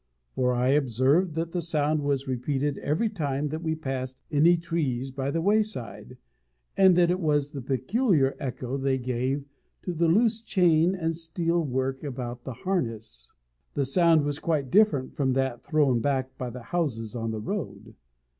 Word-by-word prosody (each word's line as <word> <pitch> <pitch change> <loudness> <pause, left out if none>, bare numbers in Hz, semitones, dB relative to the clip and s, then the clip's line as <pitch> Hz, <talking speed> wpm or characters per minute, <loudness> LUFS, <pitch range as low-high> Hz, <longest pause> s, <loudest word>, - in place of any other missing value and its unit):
For 125 -1 +1
I 125 +1 +1
observed 140 - +2
that 165 0 -2
the 175 - -2
sound 155 -2 0
was 140 -1 -1
repeated 135 +3 -1
every 155 +11 0
time 150 -8 -2
that 155 +2 -4
we 160 -1 -1
passed 130 -4 -4
any 165 +4 +5
trees 140 -6 -2
by 135 +1 -3
the 165 +3 -1
wayside, 210 - -1 0.6
and 190 -2 +6
that 175 0 +4
it 180 - 0
was 145 -4 +1
the 140 -3 -6
peculiar 135 - +1
echo 130 0 -4
they 135 -1 0
gave 130 +2 -2 0.4
of 175 -3 -4
the 170 - +4
loose 220 +5 +3
chain 180 -4 +3
and 165 -3 -2
steel 170 +1 -1
work 130 0 -2
about 125 -3 -5
the 130 - -5
harness. 115 - -3 0.4
The 140 - +1
sound 165 +2 +4
was 145 0 -2
quite 150 -6 -1
different 200 -11 +3
from 130 -2 +1
that 130 -2 -1
thrown 140 -6 +2
back 130 +1 -1
by 125 - -4
the 120 0 -9
houses 125 -6 -2
on 115 -1 -2
the 110 -1 -3
road. 110 - -5
145 Hz, 170 wpm, -27 LUFS, 130-170 Hz, 0.6 s, and